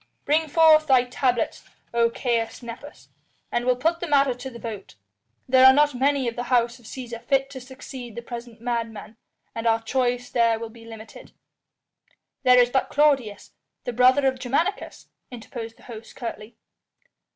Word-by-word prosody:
Bring 315 +2 +2
forth 310 0 +5
thy 260 -3 +5
tablets, 250 -1 -1 0.3
O 235 0 +3
Caius 235 -1 -2
Nepos, 240 +5 -10 0.4
and 240 0 -1
we'll 250 - +4
put 330 +7 0
the 345 - -4
matter 280 -3 +3
to 250 +2 -8
the 235 - -11
vote. 220 - -8 0.5
There 260 0 +5
are 260 0 +9
not 295 +1 +3
many 270 +1 +1
of 230 - -3
the 245 - -4
House 240 -1 +1
of 240 - -20
Cæsar 235 -1 -8
fit 270 0 0
to 260 -2 -8
succeed 255 -2 -10
the 235 - -7
present 235 -1 -9
madman, 230 -2 -4 0.4
and 230 0 -3
our 225 0 +3
choice 245 +1 -1
there 230 -2 +2
will 225 0 -7
be 230 0 -15
limited." 225 -1 -12 1.1
"There 250 0 +5
is 245 0 +4
but 265 - 0
Claudius, 275 -8 +1 0.3
the 245 - -4
brother 255 +3 +4
of 260 -1 +1
Germanicus," 320 +11 -2 0.2
interposed 230 -1 -8
the - - -20
host 225 -2 -11
curtly. 230 -2 -7
245 Hz, 170 wpm, -24 LUFS, 230-265 Hz, 1.1 s, are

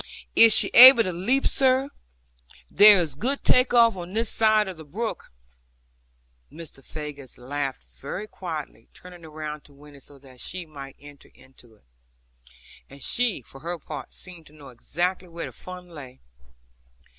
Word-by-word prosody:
'Is 230 -1 +8
she - - +6
able 250 -1 +10
to 185 -3 -4
leap, 235 +11 -1
sir? 265 +1 0 0.8
There 205 -1 +6
is 160 -5 -4
good 255 - -4
take 250 +1 +2
off 235 -2 +4
on 180 0 -9
this 225 +1 -1
side 215 -1 +2
of 190 - -7
the 160 - -12
brook.' 215 +10 -7 1.2
Mr. 155 -4 -12
Faggus 145 -4 -10
laughed 135 - -6 0.2
very 210 +3 -7
quietly, 155 - -9
turning 180 -1 -15
round 155 -2 -9
to 145 - -21
Winnie 145 0 -17
so 140 +1 -16
that 130 -2 -19
she 180 -1 -8
might 140 -3 -12
enter 145 -1 -17
into 120 -4 -21
it. 105 - -32 1.1
And 140 -1 -11
she, 235 - -1
for 135 - -9
her 170 +4 -6
part, 150 -3 -10
seemed 175 -4 -11
to 150 - -20
know 145 -3 -15
exactly 175 +9 -4
where 170 0 -8
the - - -9
fun 180 -1 -9
lay. 135 -6 -13
165 Hz, 160 wpm, -23 LUFS, 140-210 Hz, 1.2 s, able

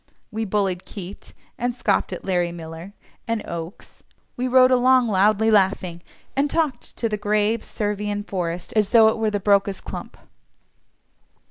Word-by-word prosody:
We 220 0 -2
bullied 190 -3 -1
Keate, 195 0 -10 0.3
and 245 0 -1
scoffed 210 -6 0
at 180 - -6
Larrey 175 -2 0
Miller, 165 +3 -9 0.3
and 230 -1 -2
Okes; 170 +3 -8 0.3
we 250 +1 -2
rode 255 0 +5
along 255 0 +5
loudly 215 +1 +3
laughing, 190 -4 +1 0.3
and 280 +2 +1
talked 300 -7 -2
to 230 - 0
the 210 -1 -2
grave 210 +2 +1
Servian 205 -1 -3
forest 175 -3 -4
as 210 -2 +2
though 225 -2 +7
it 220 - -2
were 220 -1 +1
the 205 -1 -1
"Brocas 200 -1 +2
clump." - - -8
210 Hz, 150 wpm, -23 LUFS, 190-230 Hz, 0.3 s, though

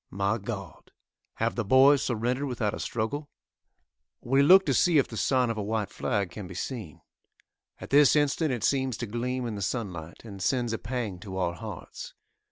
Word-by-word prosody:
My 100 +4 -1
God! 100 - -7 0.4
have 115 +1 0
the 120 - -2
boys 135 +5 +6
surrendered 125 +3 -1
without 115 -5 -1
a - - -5
struggle? 140 +6 -3 0.9
We 135 +3 +2
look 190 +7 +7
to - - +1
see 175 -4 +4
if 140 - +3
the 115 - -9
sign 125 +1 +1
of 110 - -4
a - - -1
white 105 -1 -2
flag 100 -4 -2
can 95 +1 -7
be 90 - -10
seen. 105 - -6 0.8
At - - -10
this 145 +1 +6
instant 150 +1 +1
it 120 -4 -3
seems 130 -2 +1
to 120 - -4
gleam 125 +3 -3
in 115 - -3
the 100 - -5
sun 105 -1 -2
light, 85 +5 -10
and 100 -3 -9
sends 120 +3 0
a 115 - -2
pang 115 -6 -4
to 95 0 -7
our 90 -2 0
hearts. 105 -1 -8
115 Hz, 195 wpm, -27 LUFS, 100-130 Hz, 0.9 s, look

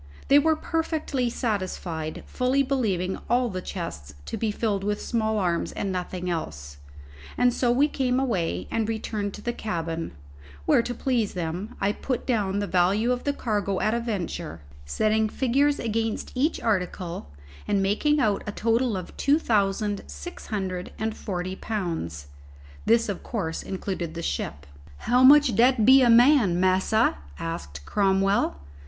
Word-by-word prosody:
They 280 - +8
were 315 +2 +3
perfectly 310 -6 -1
satisfied, 185 -9 -3
fully 260 +2 +1
believing 205 -9 -1
all 245 0 +2
the 185 -2 -4
chests 75 - -6
to - - -4
be 225 - -1
filled 205 -2 -1
with 205 +1 -1
small 220 -2 -1
arms 175 -4 0
and 195 - -2
nothing 180 0 -4
else, 70 - -4 0.6
and 245 0 +4
so 245 - +1
we 275 +5 +4
came 260 -3 0
away 175 - -1
and 225 -1 0
returned 215 -2 -3
to 210 - -11
the 240 - -1
cabin, 165 -7 -3 0.5
where, - - +5
to 245 +1 -4
please 235 -6 0
them, 175 +4 -4
I 200 - +2
put 250 +3 -3
down 205 -6 0
the 205 - 0
value 195 +6 +2
of 250 0 -2
the 285 - +2
cargo 205 -8 -1
at 215 - +1
a 235 - +1
venture, 175 - -4 0.3
setting 215 - +1
figures 275 +5 +2
against 225 -1 -2
each 280 +5 +1
article, 180 - -2 0.4
and 200 - +2
making 295 +10 +2
out 210 -6 +1
a - - -1
total 230 0 +1
of 180 - -8
two 285 +2 +3
thousand 205 -5 0
six 70 0 -9
hundred 185 -4 -3
and 220 0 -2
forty 185 -2 -4
pounds. 165 - -4 0.6
This 230 0 +4
of 200 -3 -3
course 175 -9 -3
included 185 -3 -4
the 170 - -5
ship. 70 - -3 0.3
"How 245 - +2
much'll 285 -1 +7
dat 240 0 +4
be 265 +1 +8
a 245 - +5
man, 235 - +6
massa?" 185 - +2 0.2
asked 70 -3 -6
Cromwell. 195 - +2
210 Hz, 160 wpm, -26 LUFS, 180-240 Hz, 0.6 s, They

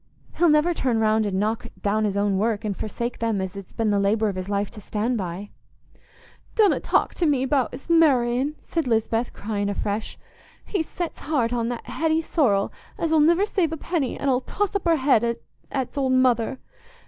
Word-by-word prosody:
He'll 345 -1 +4
never 300 +3 +4
turn 255 -7 0
round 220 0 +2
and 190 -1 -1
knock 215 +2 -1
down 215 +1 +1
his 200 -1 -1
own 200 -1 +1
work, 220 0 0
and 205 -2 -1
forsake 235 +4 -4
them 225 -3 0
as 190 0 -4
it's 195 -2 -9
been 225 -2 0
the 200 - +2
labour 210 +2 +2
of 195 - -4
his 185 +1 -5
life 200 0 -1
to 215 - -11
stand 220 +5 -1
by." 190 0 -5 1.0
"Donna 425 -4 +4
talk - - +1
to 340 - 0
me 275 -3 +2
about's 265 0 -1
marr'in'," 280 -4 +3
said 330 -5 -2
Lisbeth, 225 +1 0
crying 205 -1 -3
afresh. 205 +1 -3 0.5
"He's 350 -6 -2
set's 345 -2 -5
heart 255 -6 0
on 235 -1 0
that 240 -1 -5
Hetty 320 0 0
Sorrel, 215 - +1 0.2
as 325 -1 0
'ull 315 - +5
niver 340 +6 +4
save 365 -6 0
a 325 - -3
penny, 310 -4 -2
an' 280 - -2
'ull 255 -1 +2
toss 410 +8 -2
up 400 - -1
her 335 -1 +4
head 235 -5 +2 0.3
at's 265 +1 -3
old 260 -1 +1
mother. 255 -1 +2
240 Hz, 195 wpm, -24 LUFS, 210-300 Hz, 1.0 s, ull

